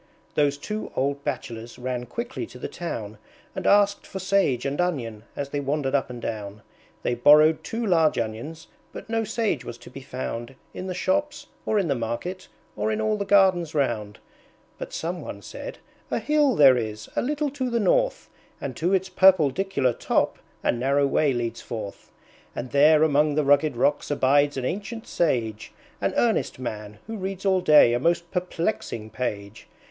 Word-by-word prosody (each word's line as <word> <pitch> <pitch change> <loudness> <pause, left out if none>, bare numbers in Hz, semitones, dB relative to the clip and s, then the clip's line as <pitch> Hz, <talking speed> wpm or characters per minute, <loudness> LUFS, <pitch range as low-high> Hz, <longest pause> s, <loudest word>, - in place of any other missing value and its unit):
Those 145 -1 +2
two 210 +9 -5
old 140 +1 -1
Bachelors 115 -4 -5
ran 125 -1 -4
quickly 240 - -5
to - - -12
the - - -5
town 110 -11 -6 0.4
And - - -2
asked 200 0 +3
for 190 - -7
Sage 190 -10 +1
and 140 +5 0
Onion 115 -11 -3
as 140 -1 -4
they 145 - -2
wandered 140 -1 -1
up 140 -2 +1
and 125 -1 -7
down; 105 -2 -5 0.4
They 120 - +1
borrowed 150 +5 +6
two 230 +1 -3
large 165 -6 +3
Onions, 120 +9 -4 0.3
but - - -9
no 225 0 +1
Sage 225 - -1
was 115 - -7
to 120 - -14
be 135 - -9
found 130 -1 -5 0.2
In 185 - -6
the 185 - -3
Shops, 295 +8 -1 0.2
or 215 - +2
in 195 -4 +1
the 140 - +2
Market, 125 +11 -4 0.3
or 105 +1 -1
in 110 - -1
all 215 0 +1
the 200 -1 -3
Gardens 185 -5 +4
round. 115 -7 -1 0.6
But - - -6
some 175 +2 -4
one - - -8
said, - - -8 0.3
"A - - 0
hill 295 -4 +2
there 135 -5 +7
is, 110 -2 -4
a - - +2
little 295 +2 -1
to 260 -2 -2
the 235 -1 0
north, - - +1 0.3
And - - -5
to 180 +4 +2
its 190 0 0
purpledicular 185 -6 +3
top - - 0 0.2
a - - +3
narrow 135 +4 +1
way 140 +1 +2
leads 120 -2 -3
forth; 105 -4 -7 0.5
And 125 0 -5
there 150 +3 +6
among 150 -1 +3
the 155 - +2
rugged 145 -1 +3
rocks 145 +4 +1
abides 145 0 +3
an 130 - -2
ancient 210 - -4
Sage, 115 -10 -1 0.3
An - - 0
earnest - - +1
Man, 105 -4 -6
who 225 0 -6
reads 195 0 -5
all 190 -1 +3
day 150 -8 +6
a 120 - +1
most 170 +4 0
perplexing 175 - -3
page. 100 -5 -5
145 Hz, 180 wpm, -25 LUFS, 120-190 Hz, 0.6 s, there